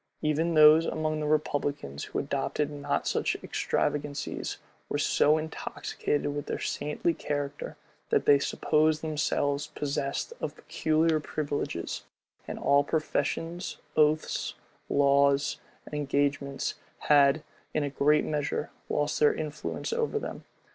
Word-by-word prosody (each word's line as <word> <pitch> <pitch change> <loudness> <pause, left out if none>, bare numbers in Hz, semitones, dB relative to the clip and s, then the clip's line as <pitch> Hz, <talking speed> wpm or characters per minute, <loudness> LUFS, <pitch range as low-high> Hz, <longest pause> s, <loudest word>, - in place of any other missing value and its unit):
Even 160 +2 +1
those 155 +1 +8
among 155 0 -1
the 150 - -2
republicans 145 - -1
who - - -5
adopted 150 -1 -1
not 145 -1 -2
such - - 0
extravagancies, 145 -1 -2 0.3
were - - 0
so 150 +1 +3
intoxicated 150 -2 -2
with 145 - -4
their - - -2
saintly 150 +3 -1
character, 145 -1 -4 0.3
that - - +2
they 140 -1 +6
supposed 155 +2 +2
themselves 150 -2 0
possessed 140 - -3
of - - -3
peculiar 160 0 +1
privileges; 145 - -3 0.4
and - - -5
all 140 0 +4
professions, 165 +3 -2 0.2
oaths, 155 0 +2 0.3
laws, 140 0 +3 0.3
and - - -13
engagements, 140 -1 0 0.3
had, 145 +1 +5 0.3
in 155 - 0
a 145 - -1
great 150 +2 +3
measure, 150 0 -2 0.2
lost 145 0 0
their 150 - +5
influence 155 - -4
over 460 -1 0
them. 435 - -5
150 Hz, 120 wpm, -29 LUFS, 145-155 Hz, 0.4 s, those